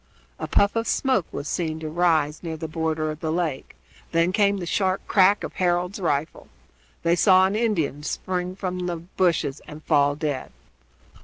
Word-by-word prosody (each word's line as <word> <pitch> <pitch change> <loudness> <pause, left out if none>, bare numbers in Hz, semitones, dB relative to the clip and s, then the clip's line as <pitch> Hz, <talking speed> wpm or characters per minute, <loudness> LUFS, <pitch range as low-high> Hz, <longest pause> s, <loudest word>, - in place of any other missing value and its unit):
A - - -4
puff 200 +2 +2
of 230 0 -1
smoke 260 - +1
was 145 - -5
seen 160 -1 -2
to 155 - -4
rise 160 -2 +1
near 165 -2 -5
the 160 - -5
border 155 0 -1
of 155 - -8
the 160 -1 -2
lake; 160 -5 -2 0.4
then 165 +2 +3
came 200 0 +2
the 180 - -4
sharp 190 +2 0
crack 200 +1 +4
of - - -5
Harold's 180 +2 0
rifle. 155 -4 -2 0.6
They 170 +1 +3
saw 185 +1 +5
an 195 +2 0
Indian 185 - 0
spring 180 +4 -3
from 180 -2 -3
the 175 - -2
bushes 170 -4 -1
and 150 +1 -10
fall 145 0 +3
dead. 145 -3 -3
170 Hz, 175 wpm, -24 LUFS, 155-185 Hz, 0.6 s, saw